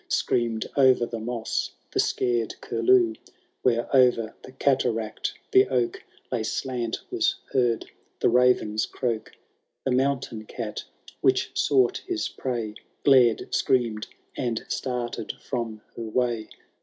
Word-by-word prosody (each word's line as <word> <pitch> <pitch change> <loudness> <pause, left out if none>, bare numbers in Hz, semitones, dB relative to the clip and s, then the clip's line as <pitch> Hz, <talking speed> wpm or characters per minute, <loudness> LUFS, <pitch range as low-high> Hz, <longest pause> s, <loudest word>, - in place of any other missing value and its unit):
Scream^ 115 -2 0
o^er 130 -3 +4
the 115 - -3
moss 115 0 -2 0.2
the - - -1
scared 120 -3 +1
curlew; 115 0 +3 0.5
Where 120 -2 +2
o'er 120 -4 +4
the - - -12
cataract 125 -5 0 0.2
the 130 0 +6
oak 125 -2 0 0.3
Lay - - 0
slant, 120 -3 -2
was - - +2 0.2
heard 120 -4 +2 0.3
the - - +3
raven's 120 -3 +3
croak; 115 -4 -3 0.5
The 130 - +1
mountaiti 130 -4 0
cat, 110 -3 -5 0.4
which - - +2
sought 130 -4 +3
his 355 -3 -1
prey 120 -5 -3 0.3
Glared, 125 -5 +4
scream'd, 115 -4 +1 0.3
and 120 -3 -2
started 120 -3 -3
from 115 -4 -4
her - - -6
way. 115 0 -1
120 Hz, 120 wpm, -26 LUFS, 115-130 Hz, 0.5 s, the